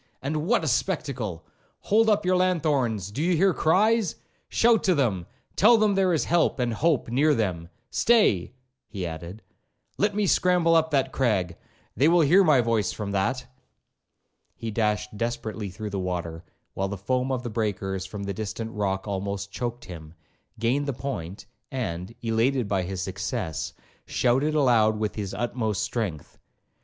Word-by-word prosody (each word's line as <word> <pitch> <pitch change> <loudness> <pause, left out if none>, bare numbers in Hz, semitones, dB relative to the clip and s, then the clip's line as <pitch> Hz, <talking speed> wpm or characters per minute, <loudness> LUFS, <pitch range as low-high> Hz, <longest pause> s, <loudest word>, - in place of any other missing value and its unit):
and 150 +4 -3
what 235 -4 +2
a - - -1
spectacle!—Hold 140 - -1
up 210 -2 +2
your 185 0 +3
lanthorns—do 140 - 0
you 175 +1 +2
hear 190 +2 +4
cries?—shout 220 +5 +1
to 185 -3 +3
them—tell 130 - +2
them 215 -2 +3
there 190 -2 +2
is 160 - +1
help 170 -3 +2
and 120 -3 0
hope 155 +4 +1
near 145 +5 +3
them.—Stay,' 105 - +1 0.4
he 95 -5 -5
added, 85 +5 -7 0.6
'let 205 0 +1
me 210 -1 +1
scramble 180 -2 +3
up 160 -1 +3
that 135 -3 +1
crag—they 105 - -1
will 170 +1 +5
hear 175 +6 +5
my 150 -7 +5
voice 115 -4 0
from 105 -2 -5
that.' 115 +7 -1 1.1
He 115 - -5
dashed 105 -1 -1
desperately 110 -2 -3
through 105 +3 -6
the 100 - -2
water, 85 -2 -4 0.3
while 95 - -1
the 100 +1 -5
foam 125 +6 -1
of 125 -2 -2
the 120 - -5
breakers 95 -4 -2
from 100 +2 -6
a 100 - -2
distant 110 +2 -5
rock 100 -2 -2
almost 100 0 -3
choaked 120 +2 -4
him, 80 -2 -10 0.4
gained 125 +6 0
the 140 - -1
point, 100 -8 -6 0.2
and, 105 -5 -4
elated 115 +2 +1
by 100 -2 0
his 95 0 -4
success, 95 -5 -4 0.3
shouted 135 +5 +1
aloud 115 -7 +3
with 105 -1 -2
his 100 -3 -5
utmost 115 -5 -1
strength. 100 - -4
115 Hz, 150 wpm, -26 LUFS, 100-155 Hz, 1.1 s, will